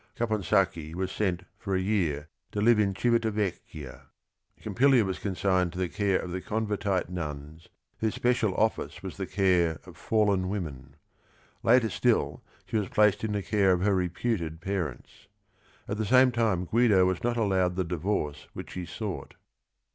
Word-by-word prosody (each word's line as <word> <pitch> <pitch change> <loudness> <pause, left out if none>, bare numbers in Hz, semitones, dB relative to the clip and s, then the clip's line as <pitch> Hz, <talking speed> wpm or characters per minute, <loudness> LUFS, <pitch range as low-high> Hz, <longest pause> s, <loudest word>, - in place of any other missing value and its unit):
Caponsacchi 95 -7 0
was 95 +1 -2
sent 95 -4 -1 0.2
for 100 -3 -2
a - - +2
year 90 -7 0 0.3
to 105 - -2
live 115 +1 +5
in 100 -2 +1
Civita 115 0 +2
Vecchia. 90 -9 -5 0.5
Pompilia 120 +2 +3
was 95 -1 -3
consigned 95 -2 0
to - - -8
the 90 -1 -1
care 100 -1 +1
of 90 - -6
the 90 +1 -3
Convertite 105 -3 -1
nuns, 80 -2 -6 0.3
whose 110 -1 -1
special 120 -5 +1
office 110 +1 -1
was - - -7
the - - -4
care 90 -5 +2
of 90 -3 -12
fallen 100 0 +1
women. 70 -9 -5 0.7
Later 115 -2 +4
still - - +1 0.2
she - - -2
was 105 -3 -1
placed 105 -1 +3
in 110 -2 -1
the 100 -1 -2
care 100 -2 +2
of 90 0 0
her 100 0 +3
reputed 90 -2 -1
parents. 85 -7 -5 0.6
At 100 - -3
the 110 - -1
same 130 +2 +6
time 110 -6 +1
Guido 105 -2 +4
was 95 -1 -1
not 120 0 0
allowed 95 -5 +1
the 95 - 0
divorce 80 -4 -2
which - - -8
he 90 -2 -5
sought. - - -6
95 Hz, 165 wpm, -28 LUFS, 90-110 Hz, 0.7 s, same